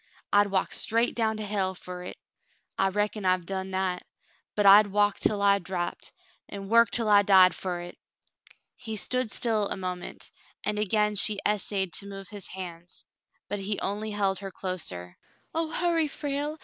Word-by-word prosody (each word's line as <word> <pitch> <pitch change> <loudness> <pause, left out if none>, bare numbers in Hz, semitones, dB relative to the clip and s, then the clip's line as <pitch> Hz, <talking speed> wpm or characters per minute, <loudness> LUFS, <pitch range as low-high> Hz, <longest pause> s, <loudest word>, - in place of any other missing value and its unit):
I'd 205 0 +5
walk 195 -1 -1
straight 230 +2 +1
down 220 -2 0
to 215 - -4
hell 195 -2 -1
fer 180 0 -8
hit, - - -7 0.3
— - - -38
I 195 - +3
reckon 210 +1 -2
I 185 -1 +4
hev 180 -2 -4
done 190 +1 -4
that, 185 -1 -1 0.3
— - - -37
but 205 - +1
I'd 205 +2 +8
walk 205 0 +1
till 205 -1 +1
I 200 0 +5
drapped, 175 -1 -4 0.4
an* 195 -1 -7
work 230 +1 +5
till 230 -2 +2
I 205 -1 +6
died 190 -3 +6
for 180 -2 -4
hit." 175 0 -9 0.8
He 220 -3 -6
stood 255 +3 0
still 220 -4 0
a - - -3
moment, 180 -1 -5 0.3
and 210 0 -1
again 210 0 +1
she 205 +1 +5
essayed 195 -3 0
to 200 - -10
move 195 -2 -8
his 205 -3 -6
hands, 175 -2 -9 0.4
but 205 - -3
he 195 +1 -2
only 210 +2 -3
held 200 -2 0
her 195 0 -6
closer. 160 - -4 0.3
"Oh, 325 0 -1
hurry, 335 -1 +1
Frale 290 +1 -3
200 Hz, 185 wpm, -27 LUFS, 190-215 Hz, 0.8 s, I'd